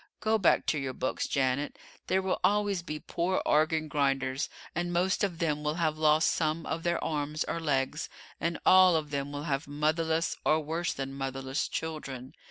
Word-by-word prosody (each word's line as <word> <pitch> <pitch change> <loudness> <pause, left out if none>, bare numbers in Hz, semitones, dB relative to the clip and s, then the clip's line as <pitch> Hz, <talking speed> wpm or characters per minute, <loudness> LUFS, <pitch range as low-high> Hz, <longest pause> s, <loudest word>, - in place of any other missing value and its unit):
Go 220 0 +2
back 190 - +3
to 150 - +1
your 135 -1 -3
books, 130 - -2
Janet. 135 +1 0 0.3
There 190 0 +2
will 190 - 0
always 205 -2 +2
be 155 -3 -5
poor 175 +4 -1
organ 155 +1 +2
grinders, 135 -2 0 0.2
and 175 +1 -2
most 185 +3 +1
of 185 -4 0
them 150 -3 -1
will 150 +1 0
have 160 -3 0
lost 155 0 +4
some 160 0 -1
of 165 - -3
their 170 0 0
arms 150 0 -1
or 165 - -3
legs, 145 -1 -1 0.3
and 170 0 -1
all 185 -2 +7
of 150 -2 -1
them 140 0 -2
will 145 0 -5
have 140 -3 -2
motherless, 160 +3 0
or 155 +1 +3
worse 165 +3 -2
than 135 0 -5
motherless, 135 0 -3
children. 140 -5 -5
155 Hz, 180 wpm, -29 LUFS, 140-170 Hz, 0.3 s, all